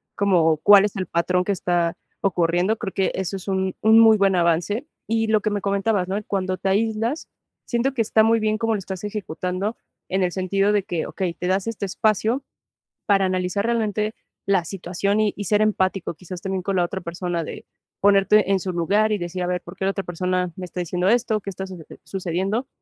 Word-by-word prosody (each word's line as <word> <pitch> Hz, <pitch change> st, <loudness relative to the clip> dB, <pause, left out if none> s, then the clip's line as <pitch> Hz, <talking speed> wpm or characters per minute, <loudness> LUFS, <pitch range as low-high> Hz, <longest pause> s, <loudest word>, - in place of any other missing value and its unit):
como 175 Hz, -6 st, +3 dB
cuál 205 Hz, +4 st, +7 dB
es 210 Hz, -, -4 dB
el 190 Hz, -2 st, -2 dB
patrón 180 Hz, +2 st, +1 dB
que 200 Hz, -, -1 dB
está 175 Hz, -3 st, 0 dB, 0.2 s
ocurriendo. 180 Hz, +2 st, +1 dB
Creo 200 Hz, -4 st, -5 dB
que 190 Hz, -, +1 dB
eso 190 Hz, +1 st, -3 dB
es 190 Hz, -, -11 dB
un 190 Hz, -1 st, -1 dB
un 220 Hz, +1 st, +6 dB
muy 225 Hz, -1 st, +7 dB
buen 195 Hz, -2 st, +3 dB
avance, 175 Hz, -, +1 dB, 0.2 s
y 225 Hz, 0 st, +1 dB
lo 215 Hz, -1 st, +3 dB
que 215 Hz, -, 0 dB
me 205 Hz, -1 st, -2 dB
comentabas, 200 Hz, -1 st, 0 dB
¿no? 200 Hz, +2 st, -1 dB
Cuando 185 Hz, -2 st, -1 dB
te 195 Hz, -, -3 dB
aíslas, 225 Hz, +7 st, 0 dB, 0.4 s
siento 245 Hz, +3 st, 0 dB
que 250 Hz, -, 0 dB
está 220 Hz, 0 st, +3 dB
muy 230 Hz, +1 st, +3 dB
bien 215 Hz, 0 st, +1 dB
cómo 225 Hz, 0 st, 0 dB
lo 210 Hz, -, -1 dB
estás 190 Hz, -1 st, -7 dB
ejecutando, 195 Hz, +1 st, -3 dB, 0.3 s
en 190 Hz, +1 st, 0 dB
el 180 Hz, -, +1 dB
sentido 195 Hz, +2 st, +1 dB
de 205 Hz, -, +2 dB
que, 170 Hz, -3 st, -3 dB
okey, 185 Hz, -3 st, -3 dB
te 180 Hz, -, -4 dB
das 190 Hz, +1 st, +1 dB
este 220 Hz, -3 st, -3 dB
espacio 220 Hz, +6 st, 0 dB, 0.6 s
para 195 Hz, -2 st, +3 dB
analizar 185 Hz, +2 st, -1 dB
realmente 220 Hz, -2 st, 0 dB, 0.3 s
la 190 Hz, -4 st, +2 dB
situación 195 Hz, +3 st, -1 dB
y 215 Hz, -2 st, +2 dB
y 205 Hz, -, -5 dB
ser 210 Hz, +3 st, +2 dB
empático, 195 Hz, -4 st, 0 dB
quizás 180 Hz, +1 st, -9 dB
también 190 Hz, -1 st, -3 dB
con 195 Hz, +1 st, -1 dB
la 175 Hz, -, +3 dB
otra 190 Hz, +2 st, -5 dB
persona, 170 Hz, 0 st, -3 dB
de -, -, -8 dB, 0.4 s
ponerte 200 Hz, 0 st, +4 dB
en 195 Hz, -, +3 dB
su 185 Hz, 0 st, -3 dB
lugar 200 Hz, +5 st, +1 dB
y 210 Hz, -, +2 dB
decir: 175 Hz, +1 st, -4 dB
"A -, -, -1 dB
ver, 180 Hz, 0 st, -1 dB
¿por 175 Hz, -, -11 dB
qué 190 Hz, -, -3 dB
la 195 Hz, -, +2 dB
otra 195 Hz, 0 st, -4 dB
persona 180 Hz, +1 st, -1 dB
me 185 Hz, -, -6 dB
está 180 Hz, +1 st, -7 dB
diciendo 180 Hz, +1 st, -1 dB
esto? 220 Hz, -2 st, +2 dB
¿Qué 200 Hz, -, -6 dB
está 190 Hz, 0 st, -5 dB
sucece 180 Hz, -4 st, -11 dB
sucediendo?". 195 Hz, +6 st, -2 dB
195 Hz, 215 wpm, -23 LUFS, 180-210 Hz, 0.6 s, cuál